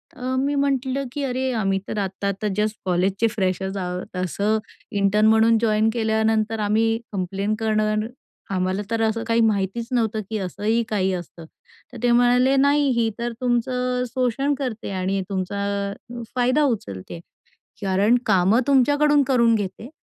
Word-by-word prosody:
अ, -, -, -13 dB, 0.2 s
मी 280 Hz, +2 st, 0 dB
म्हटलं 275 Hz, -1 st, 0 dB
की 285 Hz, +2 st, -4 dB
"अरे, 260 Hz, 0 st, -1 dB
आम्ही 195 Hz, -2 st, +1 dB
तर -, -, -4 dB
आता 200 Hz, 0 st, -2 dB
तर 215 Hz, -, 0 dB
जस्ट 215 Hz, 0 st, 0 dB
कॉलेजचे 190 Hz, +4 st, +1 dB
फ्रेशर 190 Hz, -3 st, -2 dB
आहोत. 180 Hz, 0 st, -5 dB
असं 205 Hz, +4 st, 0 dB, 0.3 s
इंटर्न 205 Hz, +1 st, +2 dB
म्हणून 220 Hz, +1 st, +5 dB
जॉइन 220 Hz, -1 st, +2 dB
केल्यानंतर 220 Hz, -1 st, +1 dB
आम्ही 225 Hz, +2 st, +1 dB
कंप्लेन 195 Hz, +1 st, -2 dB
करणार, 215 Hz, -1 st, +1 dB, 0.5 s
आम्हाला 185 Hz, +1 st, 0 dB
तर 225 Hz, 0 st, 0 dB
असं 225 Hz, 0 st, 0 dB
काही 230 Hz, 0 st, +2 dB
माहितीच 215 Hz, +1 st, 0 dB
नव्हतं 225 Hz, -3 st, 0 dB
की 220 Hz, -, -2 dB
असंही 210 Hz, +4 st, -1 dB
काही 190 Hz, -3 st, +1 dB
असतं." 175 Hz, -2 st, -7 dB, 0.5 s
तर -, -, -8 dB
ते 245 Hz, -, +3 dB
म्हणाले, 245 Hz, +2 st, +4 dB
"नाही 280 Hz, +1 st, +3 dB
ही 225 Hz, -1 st, +2 dB
तर 240 Hz, 0 st, -2 dB
तुमचं 250 Hz, +1 st, 0 dB
अ, -, -, +1 dB
शोषण 260 Hz, +3 st, 0 dB
करते 245 Hz, -7 st, -4 dB
आणि 190 Hz, +1 st, -1 dB
तुमचा 200 Hz, +1 st, -2 dB, 0.4 s
फायदा 255 Hz, +4 st, +2 dB
उचलते 170 Hz, -, -3 dB, 0.6 s
कारण 200 Hz, +4 st, +3 dB
कामं 190 Hz, +5 st, +3 dB
तुमच्याकडून 290 Hz, +2 st, +4 dB
करून 235 Hz, -4 st, +4 dB
घेते 205 Hz, +3 st, -4 dB
220 Hz, 150 wpm, -23 LUFS, 195-245 Hz, 0.6 s, म्हणून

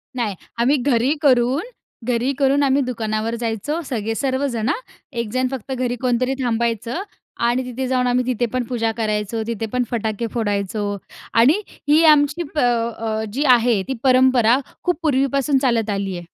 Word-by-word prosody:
नाही. 225 Hz, -6 st, -1 dB, 0.2 s
आम्ही 255 Hz, +5 st, +4 dB
घरी 250 Hz, +1 st, +2 dB
करून, 255 Hz, 0 st, +3 dB, 0.5 s
घरी 245 Hz, +2 st, +1 dB
करून 280 Hz, +1 st, +3 dB
आम्ही 275 Hz, 0 st, +3 dB
दुकानावर 225 Hz, -2 st, -2 dB
जायचो 235 Hz, -, -2 dB
सगळे 225 Hz, -2 st, -2 dB
सर्वजण 260 Hz, -3 st, -1 dB
हां. 300 Hz, -, +2 dB, 0.4 s
एकजण 255 Hz, +3 st, -1 dB
फक्त 265 Hz, 0 st, -6 dB
घरी 250 Hz, -1 st, -1 dB
कोणतरी 255 Hz, +1 st, +1 dB
थांबायचं 235 Hz, -, -1 dB, 0.5 s
आणि 245 Hz, +2 st, +1 dB
तिथे 255 Hz, +1 st, -4 dB
जाऊन 250 Hz, -1 st, +1 dB
आम्ही 250 Hz, 0 st, +1 dB
तिथे 245 Hz, -1 st, 0 dB
पण 255 Hz, -, 0 dB
पूजा 230 Hz, -3 st, 0 dB
करायचो 215 Hz, 0 st, -1 dB
तिथे 225 Hz, -1 st, -2 dB
पण 250 Hz, 0 st, +2 dB
फटाके 225 Hz, 0 st, -2 dB
फोडायचो. 205 Hz, -2 st, -1 dB, 0.4 s
आणि 270 Hz, -, +4 dB, 0.3 s
ही 305 Hz, +3 st, +5 dB
आमची 300 Hz, +2 st, +4 dB
प -, -, +1 dB
अ, 230 Hz, -3 st, 0 dB
जी 280 Hz, +5 st, 0 dB
आहे 240 Hz, -4 st, +4 dB
ती 265 Hz, -, -1 dB
परंपरा 255 Hz, -2 st, +4 dB, 0.2 s
खूप 355 Hz, -1 st, 0 dB
पूर्वीपासून 275 Hz, -1 st, +2 dB
चालत 230 Hz, -4 st, +1 dB
आली 195 Hz, -2 st, -2 dB
आहे. 175 Hz, -, -9 dB
245 Hz, 155 wpm, -21 LUFS, 225-265 Hz, 0.5 s, ही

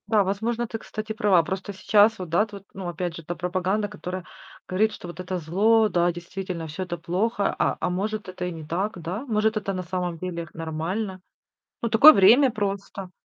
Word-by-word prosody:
Да, 210 Hz, -1 st, +4 dB
возможно, 225 Hz, +5 st, -1 dB
ты, 225 Hz, -, -4 dB
кстати, 215 Hz, 0 st, -6 dB
права. 205 Hz, -5 st, +4 dB
Просто 190 Hz, +4 st, -4 dB
сейчас 210 Hz, +3 st, +4 dB
вот, 180 Hz, -2 st, -6 dB
да, 175 Hz, +7 st, +3 dB
тут, 200 Hz, -3 st, -11 dB
ну 190 Hz, -2 st, -5 dB
опять 175 Hz, 0 st, -3 dB
же, 165 Hz, -, -9 dB
та 175 Hz, +3 st, -4 dB
пропаганда, 185 Hz, +4 st, -1 dB
которая 185 Hz, -3 st, -6 dB, 0.4 s
говорит, 210 Hz, +4 st, +2 dB
что -, -, -9 dB
вот 175 Hz, -, -9 dB
это 185 Hz, 0 st, -3 dB
зло, 210 Hz, +7 st, +3 dB
да, 175 Hz, -1 st, +2 dB
действительно 175 Hz, 0 st, -6 dB
всё 155 Hz, +5 st, -4 dB
это 175 Hz, -1 st, -4 dB
плохо, 200 Hz, +6 st, 0 dB
а -, -, +1 dB
а -, -, 0 dB
может, 210 Hz, +4 st, -2 dB
это 185 Hz, -1 st, -5 dB
и 180 Hz, -, -3 dB
не 160 Hz, -2 st, -8 dB
так, 185 Hz, +5 st, -2 dB
да? 185 Hz, -, -4 dB
Может, 220 Hz, -2 st, +1 dB
это 200 Hz, -2 st, -2 dB
на 185 Hz, -1 st, -3 dB
самом 180 Hz, -1 st, -3 dB
деле 170 Hz, -1 st, -4 dB
х -, -, -18 dB
нормально? 175 Hz, +5 st, -3 dB, 0.6 s
Ну 235 Hz, -, 0 dB
такое 255 Hz, +8 st, +9 dB
время 235 Hz, +8 st, +6 dB
просто. 195 Hz, -2 st, -4 dB
190 Hz, 205 wpm, -25 LUFS, 175-215 Hz, 0.6 s, такое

